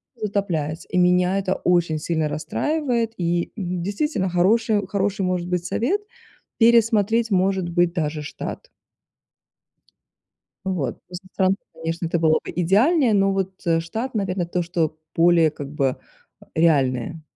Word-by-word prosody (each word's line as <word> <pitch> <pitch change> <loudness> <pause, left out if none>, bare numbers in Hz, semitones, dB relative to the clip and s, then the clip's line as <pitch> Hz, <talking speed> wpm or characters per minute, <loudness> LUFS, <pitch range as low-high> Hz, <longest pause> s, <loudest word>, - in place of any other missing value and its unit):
затопляется. 190 -8 -2
И 180 - -1
меня 180 +1 +3
это 190 -1 -1
очень 175 -3 +1
сильно 160 -1 -1
расстраивает. 235 - -1
И, 170 -1 -1
действительно, 190 - -2
хорошая 205 +4 +2
хороший, 200 0 -1
может 180 -1 -1
быть, 180 -1 -1
совет 280 - 0 0.6
пересмотреть, 225 -1 +3
может 190 -1 +1
быть, 175 0 +2
даже 155 -2 -2
штат. 145 - -7 1.9
Вот, 170 -11 -2
после 180 +1 -10
стран 190 -1 +2
это, 195 - -10
конечно, 165 +1 -2
это 170 +1 0
было 160 -1 +3
бы - - -5
идеальнее, 220 - +3
но 195 -1 +3
вот, 190 -1 -1
э, 165 -1 +3
штат, 225 +11 -5
наверное, 190 -4 -1
то, 175 +1 -1
что 165 -3 -2 0.2
более, 165 -1 +4
как 145 -2 -8
бы, 135 -3 0 0.4
э, - - -16
реальное. 145 -2 +1
180 Hz, 140 wpm, -22 LUFS, 165-205 Hz, 1.9 s, более